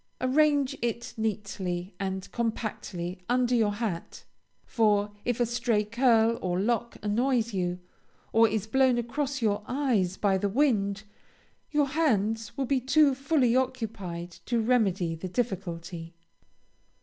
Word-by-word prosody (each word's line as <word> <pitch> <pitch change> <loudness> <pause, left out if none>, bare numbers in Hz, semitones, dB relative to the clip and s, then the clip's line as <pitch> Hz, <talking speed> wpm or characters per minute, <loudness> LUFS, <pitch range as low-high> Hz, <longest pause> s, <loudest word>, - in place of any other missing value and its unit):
Arrange 285 +1 +2
it 235 0 -3
neatly 195 -4 -3
and 190 -1 -4
compactly 210 -6 -3
under 250 0 +2
your 220 -4 +3
hat, 205 -6 -4 0.4
for 210 -3 +2
if 245 -1 0
a 240 - +3
stray 235 -2 +1
curl 230 0 +3
or 180 -1 -1
lock 235 +3 -1
annoys 235 +2 +1
you, 180 -2 -1 0.6
or 225 0 +6
is 215 -1 -1
blown 260 +2 +3
across 265 +2 -2
your 205 -1 +1
eyes 240 -9 0
by 195 -2 +2
the 200 - 0
wind, 210 -5 +1 0.7
your 295 -2 +1
hands 225 -7 0
will 275 - 0
be 270 +1 +1
too 280 +2 +4
fully 270 -3 +2
occupied 215 -9 -2
to 235 -1 0
remedy 205 -8 +1
the 165 +3 -6
difficulty. 175 -6 -4
225 Hz, 130 wpm, -28 LUFS, 195-250 Hz, 0.7 s, or